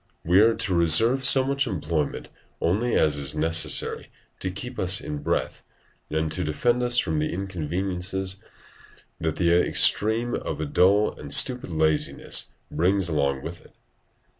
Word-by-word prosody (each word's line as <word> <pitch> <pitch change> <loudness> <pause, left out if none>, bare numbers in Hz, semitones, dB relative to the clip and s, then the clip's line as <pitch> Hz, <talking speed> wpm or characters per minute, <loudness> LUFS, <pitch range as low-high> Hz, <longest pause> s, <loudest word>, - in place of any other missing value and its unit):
We 90 +3 +4
are 115 +2 +4
to 95 - -2
reserve 90 - +3
so 130 0 +6
much 140 0 -1
employment 80 -6 -3 0.3
only 110 +8 0
as 75 -2 +2
is 70 +1 -2
necessary 80 +1 0 0.3
to 95 - -3
keep 125 +7 -8
us 95 +1 +2
in 75 -1 -6
breath - - -3 0.5
and 80 0 -2
to 80 - -2
defend 120 +11 0
us 120 0 +1
from 80 -9 0
the 75 - -2
inconveniences 95 +1 -4 0.8
that 80 -1 -2
the 85 0 +1
other 90 - +3
extreme 115 +3 +2
of - - -4
a 80 - -2
dull 95 +8 +2
and 70 -1 -9
stupid 125 - +3
laziness 80 -2 0 0.2
brings 95 +1 +1
along 70 -3 -1
with 85 +2 -8
it. - - -22
90 Hz, 155 wpm, -24 LUFS, 80-105 Hz, 0.8 s, so